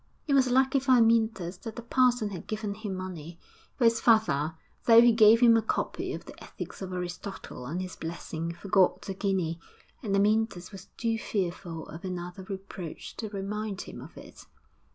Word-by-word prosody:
It 290 Hz, -, 0 dB
was 265 Hz, -2 st, +4 dB
lucky 265 Hz, +2 st, +3 dB
for 265 Hz, 0 st, +3 dB
Amyntas 225 Hz, -6 st, +3 dB
that 225 Hz, +1 st, -7 dB
the 240 Hz, -, -7 dB
parson 245 Hz, -3 st, +2 dB
had 180 Hz, -, -7 dB
given 215 Hz, -1 st, -3 dB
him 205 Hz, -2 st, -5 dB
money, 175 Hz, -3 st, -7 dB, 0.4 s
for 255 Hz, -, 0 dB
his 230 Hz, 0 st, +4 dB
father, 170 Hz, -10 st, +3 dB, 0.3 s
though 230 Hz, -1 st, +8 dB
he 240 Hz, 0 st, +7 dB
gave 225 Hz, +1 st, +6 dB
him 235 Hz, -2 st, +7 dB
a 225 Hz, -, +4 dB
copy 220 Hz, -, -2 dB
of -, -, -7 dB
the -, -, -12 dB
Ethics -, -, -8 dB
of 190 Hz, -1 st, -5 dB
Aristotle 180 Hz, -7 st, -6 dB
and 175 Hz, +6 st, -3 dB
his 185 Hz, -, -7 dB
blessing, 165 Hz, 0 st, -5 dB
forgot 185 Hz, +2 st, +2 dB
the 195 Hz, -, -4 dB
guinea; 185 Hz, -4 st, -1 dB, 0.4 s
and 200 Hz, -5 st, -1 dB
Amyntas 210 Hz, -2 st, +1 dB
was 195 Hz, -1 st, -10 dB
too 225 Hz, -1 st, 0 dB
fearful 175 Hz, -5 st, -3 dB
of 160 Hz, -, -9 dB
another 180 Hz, 0 st, -5 dB
reproach 190 Hz, -3 st, -8 dB
to 220 Hz, -, -4 dB
remind 205 Hz, 0 st, -4 dB
him -, -, -9 dB
of -, -, -12 dB
it. -, -, -13 dB
200 Hz, 180 wpm, -28 LUFS, 180-225 Hz, 0.4 s, though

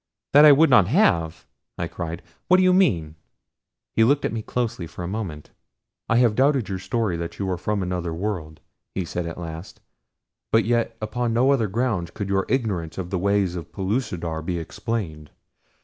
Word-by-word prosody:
"That 145 Hz, +2 st, +9 dB
I 150 Hz, -, +10 dB
would 145 Hz, +1 st, +5 dB
not 105 Hz, -8 st, +6 dB
have!" 85 Hz, -, +2 dB, 0.3 s
I -, -, -2 dB
cried. 85 Hz, 0 st, -6 dB, 0.2 s
"What 185 Hz, -, +6 dB
do 185 Hz, -, +4 dB
you 185 Hz, 0 st, +5 dB
mean?" 85 Hz, -, +2 dB, 0.8 s
He 110 Hz, -, +5 dB
looked 140 Hz, +5 st, +3 dB
at -, -, -1 dB
me 115 Hz, -, -2 dB
closely 110 Hz, -7 st, -3 dB
for 90 Hz, -, -8 dB
a -, -, -3 dB
moment. 90 Hz, -7 st, -5 dB, 0.6 s
"I 115 Hz, -, +3 dB
have 120 Hz, -3 st, +4 dB
doubted 130 Hz, -2 st, +2 dB
your 95 Hz, -1 st, -3 dB
story 100 Hz, -1 st, -1 dB
that 85 Hz, 0 st, -5 dB
you 100 Hz, -, -2 dB
are -, -, 0 dB
from 105 Hz, +1 st, -1 dB
another 90 Hz, -2 st, -3 dB
world," 85 Hz, -3 st, -4 dB, 0.3 s
he 95 Hz, -, -1 dB
said 85 Hz, +1 st, -4 dB
at 85 Hz, -, -6 dB
last, 80 Hz, +1 st, -8 dB, 0.7 s
"but 115 Hz, 0 st, +4 dB
yet 115 Hz, 0 st, 0 dB
upon 115 Hz, +2 st, -1 dB
no 130 Hz, +4 st, +3 dB
other 120 Hz, -6 st, +2 dB
grounds 105 Hz, -4 st, -1 dB
could 100 Hz, -3 st, -5 dB
your 95 Hz, 0 st, 0 dB
ignorance 100 Hz, -11 st, -1 dB
of 90 Hz, -2 st, -5 dB
the 95 Hz, -, 0 dB
ways 100 Hz, -1 st, +1 dB
of 85 Hz, -3 st, -7 dB
Pellucidar 95 Hz, -6 st, -2 dB
be 85 Hz, +2 st, -3 dB
explained. 80 Hz, -3 st, -4 dB
100 Hz, 190 wpm, -23 LUFS, 85-120 Hz, 0.8 s, I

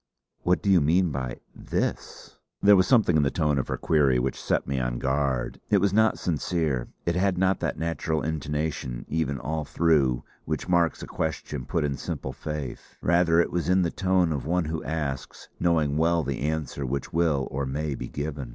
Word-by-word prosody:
"What 90 Hz, +2 st, +1 dB
do 100 Hz, -, +3 dB
you 90 Hz, -4 st, +6 dB
mean 85 Hz, +4 st, +3 dB
by 65 Hz, -3 st, -4 dB
'this'?" -, -, -4 dB, 0.2 s
There 100 Hz, 0 st, +7 dB
was 95 Hz, -1 st, +4 dB
something 110 Hz, -10 st, +4 dB
in 75 Hz, -, +5 dB
the 70 Hz, -, +2 dB
tone 75 Hz, -2 st, +1 dB
of -, -, -2 dB
her -, -, -2 dB
query 70 Hz, -5 st, +3 dB
which 65 Hz, +1 st, -2 dB
set -, -, 0 dB
me 70 Hz, -1 st, -1 dB
on -, -, -1 dB
guard. 65 Hz, -1 st, -1 dB
It 105 Hz, -, +5 dB
was 100 Hz, 0 st, +2 dB
not 110 Hz, +1 st, +4 dB
sincere; 80 Hz, -6 st, -1 dB, 0.2 s
it 85 Hz, -, +1 dB
had 95 Hz, 0 st, +1 dB
not 95 Hz, 0 st, +2 dB
that -, -, -2 dB
natural 80 Hz, -1 st, -1 dB
intonation, 75 Hz, -5 st, -3 dB
even, 75 Hz, -3 st, -1 dB
all 75 Hz, +5 st, -3 dB
through, 70 Hz, -6 st, +2 dB, 0.2 s
which 80 Hz, +1 st, -3 dB
marks 85 Hz, -2 st, +2 dB
a -, -, -4 dB
question 75 Hz, -4 st, -4 dB
put 80 Hz, -, 0 dB
in 70 Hz, -2 st, -1 dB
simple 65 Hz, -, -5 dB
faith. 75 Hz, -5 st, -6 dB
Rather 85 Hz, 0 st, +4 dB
was 85 Hz, -1 st, -2 dB
it -, -, +5 dB
in 95 Hz, -, +4 dB
the 85 Hz, -, 0 dB
tone 95 Hz, -3 st, +2 dB
of 70 Hz, -, -3 dB
one 90 Hz, 0 st, +1 dB
who 80 Hz, +1 st, -3 dB
asks, 70 Hz, -4 st, -4 dB
knowing 80 Hz, -4 st, +2 dB
well 85 Hz, +1 st, +2 dB
the 70 Hz, -2 st, -3 dB
answer 75 Hz, -1 st, -2 dB
which 65 Hz, +1 st, -3 dB
will 80 Hz, -5 st, +2 dB
or 70 Hz, 0 st, -2 dB
may 75 Hz, +2 st, -2 dB
be -, -, -5 dB
given. 70 Hz, -3 st, -5 dB
80 Hz, 195 wpm, -26 LUFS, 70-85 Hz, 0.2 s, There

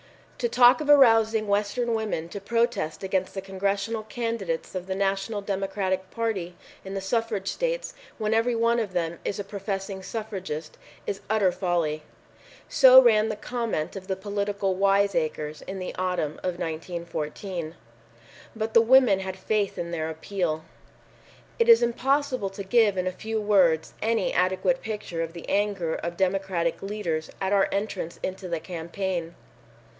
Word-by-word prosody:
"To 240 Hz, -, 0 dB
talk 245 Hz, +4 st, +6 dB
of 295 Hz, -, -4 dB
arousing 225 Hz, -6 st, +6 dB
the 205 Hz, -, -3 dB
Western 210 Hz, +4 st, 0 dB
women 215 Hz, -7 st, -2 dB
to 200 Hz, -, -7 dB
protest 230 Hz, -6 st, -1 dB
against 190 Hz, 0 st, -1 dB
the 195 Hz, -, -3 dB
Congressional 200 Hz, +3 st, -2 dB
candidates 215 Hz, -6 st, -3 dB
of 185 Hz, -1 st, -5 dB
the 190 Hz, -, -2 dB
National 195 Hz, +2 st, -1 dB
Democratic 195 Hz, -1 st, -2 dB
Party 195 Hz, -7 st, -3 dB, 0.3 s
in 195 Hz, 0 st, -6 dB
the 195 Hz, -, -2 dB
suffrage 210 Hz, -1 st, -1 dB
states, -, -, -2 dB, 0.2 s
when 215 Hz, -1 st, 0 dB
every 230 Hz, +2 st, +2 dB
one 230 Hz, +1 st, +2 dB
of 205 Hz, -5 st, -3 dB
them 170 Hz, -1 st, -2 dB
is 200 Hz, -, -2 dB
a 205 Hz, -, -3 dB
professing 195 Hz, -1 st, -4 dB
suffragist, 190 Hz, -8 st, -5 dB, 0.3 s
is 195 Hz, -, -3 dB
utter 210 Hz, -4 st, +3 dB
folly." 175 Hz, -4 st, -1 dB, 0.7 s
So 260 Hz, -1 st, +8 dB
ran 220 Hz, -3 st, +5 dB
the 215 Hz, -, -2 dB
comment 230 Hz, -8 st, -3 dB
of 190 Hz, -1 st, -8 dB
the 190 Hz, -, -1 dB
political 200 Hz, 0 st, -1 dB
wise 200 Hz, +1 st, +3 dB
acres 155 Hz, -2 st, -2 dB
in 190 Hz, -, -6 dB
the 185 Hz, -1 st, -5 dB
autumn 180 Hz, -5 st, -2 dB
of 180 Hz, -1 st, -2 dB
1914. 165 Hz, +1 st, -5 dB, 0.8 s
But 220 Hz, 0 st, -3 dB
the 230 Hz, -, +7 dB
women 235 Hz, -4 st, +5 dB
had 190 Hz, -1 st, -5 dB
faith 205 Hz, +1 st, -1 dB
in 170 Hz, 0 st, -4 dB
their 160 Hz, -2 st, -2 dB
appeal. 160 Hz, -1 st, -3 dB, 0.9 s
It 465 Hz, 0 st, +3 dB
is 460 Hz, -, +8 dB
impossible 255 Hz, -2 st, +1 dB
to 195 Hz, +1 st, -7 dB
give 205 Hz, -1 st, +3 dB
in 185 Hz, -, 0 dB
a 185 Hz, -, 0 dB
few 220 Hz, +4 st, -3 dB
words 185 Hz, -7 st, +3 dB
any 225 Hz, -3 st, +1 dB
adequate 185 Hz, +8 st, +1 dB
picture 210 Hz, -6 st, -4 dB
of 165 Hz, 0 st, -4 dB
the 170 Hz, -, -9 dB
anger 195 Hz, -5 st, 0 dB
of 170 Hz, 0 st, -4 dB
Democratic 190 Hz, -3 st, 0 dB
leaders 195 Hz, -6 st, -3 dB
at 190 Hz, +1 st, 0 dB
our 195 Hz, -1 st, +3 dB
entrance 200 Hz, -4 st, -3 dB
into 190 Hz, 0 st, -4 dB
the 170 Hz, -2 st, -2 dB
campaign. 170 Hz, 0 st, -4 dB
195 Hz, 160 wpm, -26 LUFS, 180-220 Hz, 0.9 s, So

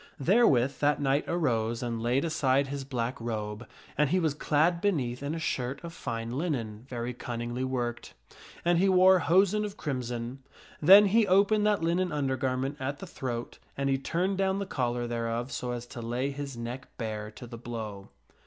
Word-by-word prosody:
Therewith 140 Hz, -, +3 dB
that 145 Hz, 0 st, +2 dB
knight 140 Hz, 0 st, +1 dB
arose 120 Hz, -8 st, 0 dB
and 115 Hz, -2 st, -3 dB
laid 125 Hz, +6 st, +1 dB
aside 140 Hz, -4 st, +2 dB
his 140 Hz, 0 st, -5 dB
black 125 Hz, -3 st, -3 dB
robe, 110 Hz, -1 st, -4 dB, 0.3 s
and 150 Hz, -1 st, +2 dB
he 185 Hz, +4 st, +2 dB
was 160 Hz, -4 st, +1 dB
clad 155 Hz, +3 st, +1 dB
beneath 130 Hz, -11 st, 0 dB
in 145 Hz, +3 st, -3 dB
a -, -, -3 dB
shirt 135 Hz, -3 st, -2 dB
of 170 Hz, -1 st, -7 dB
fine 115 Hz, -3 st, -4 dB
linen 120 Hz, -8 st, -3 dB
very 120 Hz, 0 st, -3 dB
cunningly 120 Hz, +1 st, -4 dB
worked. 120 Hz, -2 st, -3 dB, 0.5 s
And 175 Hz, 0 st, +4 dB
he 195 Hz, +2 st, +4 dB
wore 185 Hz, 0 st, +6 dB
hosen 195 Hz, +5 st, +3 dB
of 205 Hz, -1 st, -5 dB
crimson. 125 Hz, -3 st, -4 dB, 0.4 s
Then 195 Hz, +6 st, +9 dB
he 215 Hz, +2 st, +3 dB
opened 205 Hz, +3 st, +4 dB
that 205 Hz, -5 st, +2 dB
linen 175 Hz, +2 st, +1 dB
undergarment 135 Hz, -1 st, -1 dB
at 135 Hz, +2 st, -3 dB
the 195 Hz, -, -8 dB
throat 120 Hz, -8 st, -5 dB, 0.2 s
and 140 Hz, 0 st, 0 dB
he 135 Hz, -, +1 dB
turned 185 Hz, +7 st, -1 dB
down 190 Hz, 0 st, +2 dB
the 200 Hz, -, -2 dB
collar 120 Hz, -7 st, -1 dB
thereof 120 Hz, +1 st, -2 dB
so 125 Hz, -, -3 dB
as 120 Hz, -1 st, -4 dB
to 120 Hz, 0 st, -8 dB
lay 120 Hz, +4 st, -2 dB
his 140 Hz, -2 st, -6 dB
neck 120 Hz, +3 st, -6 dB
bare 110 Hz, -2 st, -4 dB
to 120 Hz, -, -10 dB
the 115 Hz, -1 st, -9 dB
blow. 110 Hz, -4 st, -6 dB
135 Hz, 180 wpm, -29 LUFS, 120-170 Hz, 0.5 s, Then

